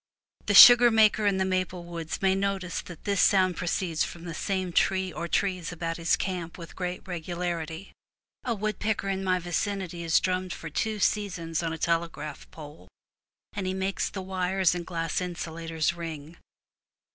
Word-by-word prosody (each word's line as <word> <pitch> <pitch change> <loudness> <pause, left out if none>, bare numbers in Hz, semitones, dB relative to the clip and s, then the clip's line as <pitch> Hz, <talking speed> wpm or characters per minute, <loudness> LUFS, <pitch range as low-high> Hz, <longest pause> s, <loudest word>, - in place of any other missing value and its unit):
The - - +2
sugar 245 0 +11
maker 215 -1 +4
in 195 -1 +2
the 190 - +1
maple 185 -1 -2
woods 170 0 -6
may 190 0 +4
notice 195 -2 -2
that 175 -3 -12
this 200 -2 +1
sound 185 -3 +4
proceeds 175 -2 -1
from 170 - -7
the 170 -2 -6
same 185 +1 -2
tree 190 +1 +1
or 170 - -4
trees 185 -1 -1
about 165 -1 -4
his 165 0 +2
camp 180 -3 -4
with 165 -2 -10
great 180 0 -5
regularity. 175 0 -4 0.5
A 240 -3 -1
woodpecker 215 -1 -2
in 195 0 -2
my 185 -1 +2
vicinity 180 0 -3
has 165 -1 +3
drummed 185 0 -2
for 165 - -8
two 220 +7 -1
seasons 180 -6 -1
on 165 -1 -2
a 165 - -4
telegraph 165 -3 -2
pole, 145 - -12 0.7
and 195 -2 -3
he 185 - -2
makes 190 +1 -1
the 190 - -6
wires 185 -1 +1
and 175 -1 -5
glass 165 -1 -2
insulators 165 -2 -3
ring. 165 -2 -7
180 Hz, 170 wpm, -27 LUFS, 165-190 Hz, 0.7 s, sugar